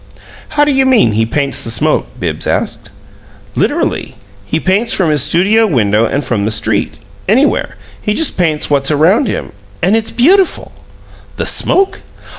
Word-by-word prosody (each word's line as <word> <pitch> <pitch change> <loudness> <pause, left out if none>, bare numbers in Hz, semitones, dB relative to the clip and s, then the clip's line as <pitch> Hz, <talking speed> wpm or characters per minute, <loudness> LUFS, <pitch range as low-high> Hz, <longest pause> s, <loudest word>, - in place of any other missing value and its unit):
"How 295 - +5
do 295 - +1
you 265 -1 +2
mean 235 - +4
he 110 +1 0
paints 140 +2 -2
the - - -5
smoke?" 115 -3 0
Bibbs - - -3
asked. - - -2 0.6
"Literally. - - -1 0.3
He 155 +10 -2
paints 200 +7 +1
from 175 -5 +1
his 150 -2 +4
studio 195 - +3
window 110 - +1
and 140 +4 -2
from 110 -4 -1
the - - 0
street 110 -1 -1 0.3
anywhere. 260 +8 +1 0.3
He 210 - -1
just 320 -3 0
paints 160 -4 0
what's 140 -2 +1
around 165 - +3
him - - -4 0.3
and 190 +5 +2
it's 225 0 -1
beautiful." 360 +10 +2 0.6
"The - - -3
smoke?" 390 0 +1
165 Hz, 160 wpm, -13 LUFS, -, 0.6 s, How